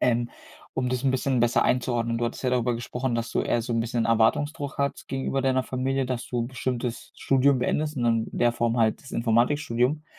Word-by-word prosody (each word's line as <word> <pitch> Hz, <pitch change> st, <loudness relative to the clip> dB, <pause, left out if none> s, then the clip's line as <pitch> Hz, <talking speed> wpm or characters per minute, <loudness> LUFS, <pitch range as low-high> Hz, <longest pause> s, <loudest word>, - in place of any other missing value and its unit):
Ähm, 120 Hz, -1 st, +1 dB, 0.4 s
um 125 Hz, -1 st, 0 dB
das 125 Hz, 0 st, -1 dB
'n 135 Hz, -, +4 dB
bisschen 130 Hz, -1 st, +1 dB
besser 120 Hz, 0 st, +3 dB
einzuordnen. 120 Hz, -2 st, +1 dB
Du 120 Hz, -, 0 dB
hattest 120 Hz, -, -4 dB
ja 125 Hz, -, +2 dB
darüber 125 Hz, -1 st, +1 dB
gesprochen, 125 Hz, +1 st, -3 dB
dass 115 Hz, 0 st, -2 dB
du -, -, +1 dB
eher 120 Hz, -, +1 dB
so 120 Hz, +1 st, -4 dB
'n 115 Hz, -, +1 dB
bisschen 115 Hz, 0 st, -1 dB
Erwartungsdruck 140 Hz, +6 st, +1 dB
hat 140 Hz, 0 st, -1 dB
gegenüber 135 Hz, 0 st, -1 dB
deiner 130 Hz, -1 st, +2 dB
Familie, 130 Hz, +1 st, -1 dB
dass 125 Hz, -1 st, -3 dB
du 120 Hz, -1 st, -2 dB
bestimmtes 125 Hz, -2 st, -4 dB
Studium 135 Hz, 0 st, +3 dB
beendest 150 Hz, +4 st, -1 dB
und 120 Hz, -, -1 dB, 0.3 s
in -, -, -5 dB
der 120 Hz, -1 st, +3 dB
Form 120 Hz, 0 st, 0 dB
halt 110 Hz, -1 st, +2 dB
das 135 Hz, -, -12 dB
Informatikstudium. 125 Hz, +4 st, +1 dB
125 Hz, 205 wpm, -26 LUFS, 120-135 Hz, 0.4 s, n